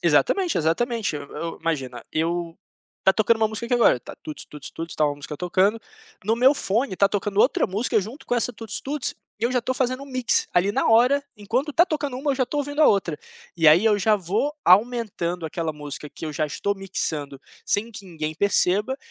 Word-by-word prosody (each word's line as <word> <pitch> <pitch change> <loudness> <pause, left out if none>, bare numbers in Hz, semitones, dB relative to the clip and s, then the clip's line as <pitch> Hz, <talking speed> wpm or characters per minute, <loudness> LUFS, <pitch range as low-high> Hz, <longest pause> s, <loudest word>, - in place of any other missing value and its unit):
Exatamente, 380 -3 +2
exatamente. 210 +4 0
E - - -4
eu, 150 +3 -6
imagina, 135 -7 -3
eu 165 +1 -1 0.4
está 190 - +4
tocando 220 +2 +3
uma 220 - +2
música 220 +2 -5
aqui 245 - +1
agora, 235 - +5
está 120 - -10
tuts-tuts-tuts, 155 +2 -8
está 155 - +1
uma 145 -1 -2
música 145 +1 -7
tocando, 185 +6 +1 0.4
no 220 +3 +1
meu 260 +4 +5
fone 220 -1 -1
está 200 +1 +3
tocando 200 0 -2
outra 260 - +3
música 210 +4 0
junto 225 +10 -9
com - - 0
essa 245 +1 0
tuts-tuts, 250 +5 -4 0.3
e - - 0
eu 240 - +2
já 255 - +2
estou 255 +2 -2
fazendo 255 +1 -1
um - - -15
mix 255 -3 +1
ali 180 +3 +3
na - - 0
hora. 245 +5 +5 0.2
Enquanto 240 +8 -1
está 340 - +5
tocando 295 -6 -3
uma, 280 +3 -1
eu - - +1
já 260 -1 +1
estou 290 +4 -2
ouvindo 290 +1 -3
a 305 - +7
outra, 180 -6 +2 0.4
e 165 -2 +2
aí 160 +7 +7
eu 215 -2 +4
já 215 +2 +3
vou 205 - -1
aumentando 190 -4 +2
aquela 160 0 -3
música 150 0 -8
que - - -9
eu 155 - -4
já 155 +1 -1
estou 200 +7 -2
mixando 155 -8 -4 0.3
sem 220 +3 0
que 205 -3 -10
ninguém 155 -3 -4
perceba. 200 +5 +2
205 Hz, 205 wpm, -24 LUFS, 165-245 Hz, 0.4 s, a